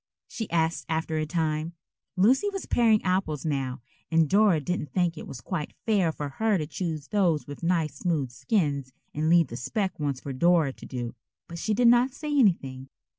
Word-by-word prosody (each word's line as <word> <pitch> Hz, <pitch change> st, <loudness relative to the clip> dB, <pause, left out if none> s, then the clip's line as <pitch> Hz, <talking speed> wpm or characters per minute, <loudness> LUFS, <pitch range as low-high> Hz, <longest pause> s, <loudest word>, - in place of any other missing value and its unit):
she 225 Hz, -, -5 dB
asked 165 Hz, -1 st, 0 dB
after 160 Hz, 0 st, -1 dB
a 155 Hz, -, -2 dB
time. 160 Hz, 0 st, -1 dB, 0.4 s
Lucy 255 Hz, -, +4 dB
was 390 Hz, -1 st, -5 dB
paring 225 Hz, -3 st, +3 dB
apples 180 Hz, -6 st, -1 dB
now, 135 Hz, -5 st, -2 dB, 0.3 s
and 160 Hz, -1 st, +3 dB
Dora 200 Hz, -2 st, +4 dB
didn't 150 Hz, -2 st, -3 dB
think 175 Hz, +2 st, +1 dB
it -, -, -8 dB
was 125 Hz, -, -8 dB
quite 165 Hz, -6 st, -4 dB
fair 200 Hz, -7 st, +2 dB
for 150 Hz, -2 st, -5 dB
her 215 Hz, +8 st, +1 dB
to 155 Hz, -, -2 dB
choose 155 Hz, -1 st, -4 dB
those 180 Hz, -7 st, +2 dB
with 145 Hz, -, -9 dB
nice 165 Hz, -4 st, 0 dB
smooth 150 Hz, -8 st, -1 dB
skins 140 Hz, -, -1 dB, 0.2 s
and 155 Hz, +2 st, 0 dB
leave 170 Hz, -4 st, +5 dB
the 120 Hz, -, -6 dB
specked 190 Hz, -, -2 dB
ones 140 Hz, -3 st, -1 dB
for 140 Hz, -, -6 dB
Dora 165 Hz, -1 st, +3 dB
to -, -, -12 dB
do. 120 Hz, -2 st, -5 dB, 0.3 s
But 170 Hz, 0 st, -7 dB
she 215 Hz, +4 st, 0 dB
did 245 Hz, +2 st, +4 dB
not 245 Hz, +2 st, +4 dB
say 300 Hz, 0 st, -3 dB
anything. 135 Hz, -, +1 dB
165 Hz, 190 wpm, -27 LUFS, 145-195 Hz, 0.4 s, leave